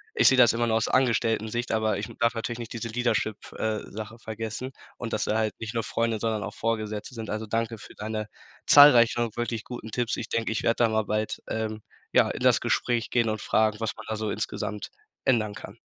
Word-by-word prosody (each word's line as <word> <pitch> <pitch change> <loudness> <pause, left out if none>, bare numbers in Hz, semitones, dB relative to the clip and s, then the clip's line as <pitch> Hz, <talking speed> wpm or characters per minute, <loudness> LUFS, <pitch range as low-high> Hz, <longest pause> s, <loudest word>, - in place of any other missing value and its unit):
ich - - +5
sehe 130 - +6
das 120 -3 +7
immer 120 0 0
nur 110 - +2
aus 110 - +1
Angestelltensicht, 115 -2 +1
aber 110 -2 +1
ich 105 - -4
darf 115 0 +3
natürlich 115 +1 -4
nicht 115 - -7
diese 115 0 -4
Leadership 110 -2 0 0.2
äh, 110 -1 -1
Sache 110 +2 -7
vergessen 110 +3 -5 0.3
und, 115 -2 -5
dass 110 - 0
sie 110 - +1
halt 110 -1 0
nicht 115 0 -5
nur 115 -1 -1
Freunde, 115 -1 -1
sondern 110 -1 -1
auch - - -5
Vorgesetzte 110 0 -2
sind. 110 -2 -6
Also 110 +1 -3
danke 115 +1 -2
für - - -12
deine 110 0 -4 0.4
zahlreichen 120 -5 +7
wirklich 120 -2 -2
guten 120 -3 -8
Tipps. 120 +1 -1
Ich - - -4
denk, 115 -1 -1
ich 110 - -2
werde 115 +1 +2
da 115 - +4
mal 110 0 +1
bald, 110 +1 -2
ähm, 110 -1 -3 0.3
ja, - - +4
in - - -5
das - - +5
Gespräch 120 -2 0
gehen 120 -2 +2
und 110 -1 -2
fragen, 110 -1 +2
was 115 -1 -1
man - - -10
da 110 - -1
so 110 0 -2
insgesamt 105 -1 -4 0.3
ändern 110 -5 +2
kann. - - -10
110 Hz, 220 wpm, -27 LUFS, 110-115 Hz, 0.4 s, das